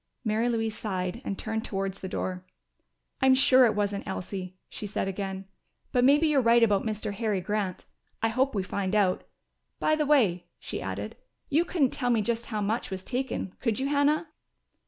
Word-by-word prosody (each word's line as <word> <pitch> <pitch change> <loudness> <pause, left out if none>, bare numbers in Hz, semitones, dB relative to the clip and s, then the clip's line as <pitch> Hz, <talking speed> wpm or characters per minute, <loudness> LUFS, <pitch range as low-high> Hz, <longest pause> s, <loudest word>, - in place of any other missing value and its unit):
Mary 220 +2 +1
Louise 225 -2 -1
sighed 185 +1 -3
and 195 - -3
turned 220 -1 -3
towards 195 -1 -3
the 190 - -5
door. 185 -1 -3 0.8
"I'm 265 0 +6
sure 260 -1 +6
it 215 - 0
wasn't 205 -1 -1
Elsie," 185 -1 -5
she 210 - -6
said 195 - -2
again. 195 0 -4 0.5
"But 245 - +3
maybe 290 +5 +5
you're 300 -3 +4
right 235 0 +5
about 205 -3 +4
Mr. 215 -1 -3
Harry 210 -2 0
Grant. 200 -1 -2 0.3
I 225 - +1
hope 255 +3 +1
we 195 - 0
find 195 +1 -2
out.... 195 -3 +2 0.6
By 310 - +3
the 305 -2 0
way," 205 - +3
she - - -6
added, - - -5 0.3
"you 310 +4 +3
couldn't 310 -7 +1
tell 250 -2 -1
me 230 -3 +3
just 235 +1 -2
how 215 -2 -2
much 215 +4 -1
was 190 -1 -5
taken, 250 -6 -3
could 230 -4 0
you, 270 +2 -1
Hannah?" 295 +2 +2
220 Hz, 185 wpm, -28 LUFS, 195-255 Hz, 0.8 s, I'm